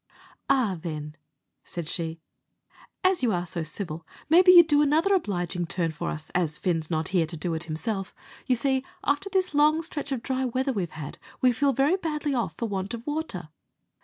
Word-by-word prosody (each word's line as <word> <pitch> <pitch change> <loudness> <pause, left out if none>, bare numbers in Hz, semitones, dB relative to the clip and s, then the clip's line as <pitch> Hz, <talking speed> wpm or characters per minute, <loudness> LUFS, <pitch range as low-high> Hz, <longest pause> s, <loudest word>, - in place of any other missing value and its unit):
"Arrah, 225 -11 +2
then," 150 -2 -5 0.5
said 170 -3 -6
she, 165 -1 -3 0.8
"as 375 -3 +3
you 245 -3 +2
are 175 -2 -1
so 170 0 -4
civil, 160 0 -5 0.3
maybe 360 +3 +8
you'd 345 -2 +10
do 295 -2 +4
another 315 +7 +3
obliging 175 - -1
turn 170 -1 -1
for 150 - -4
us, 155 0 -6
as 165 -4 0
Fin's 165 -4 -1
not 160 -1 -1
here 175 -4 +2
to 165 +1 -6
do 165 +2 -2
it 160 +1 -3
himself. 185 +5 -3 0.3
You 255 - +4
see, 265 +2 +1 0.2
after 290 +7 0
this 375 -4 0
long 305 +2 +4
stretch 290 -3 -5
of 250 -4 -2
dry 265 -1 -1
weather 260 +2 0
we've 185 -6 -2
had, 150 -3 -8 0.2
we 255 - +5
feel 275 +4 +2
very 275 +8 +2
badly 300 -5 -2
off 240 -3 -1
for 230 - -2
want 195 +2 -3
of 235 +1 -10
water. 295 - -4
225 Hz, 190 wpm, -26 LUFS, -, 0.8 s, you'd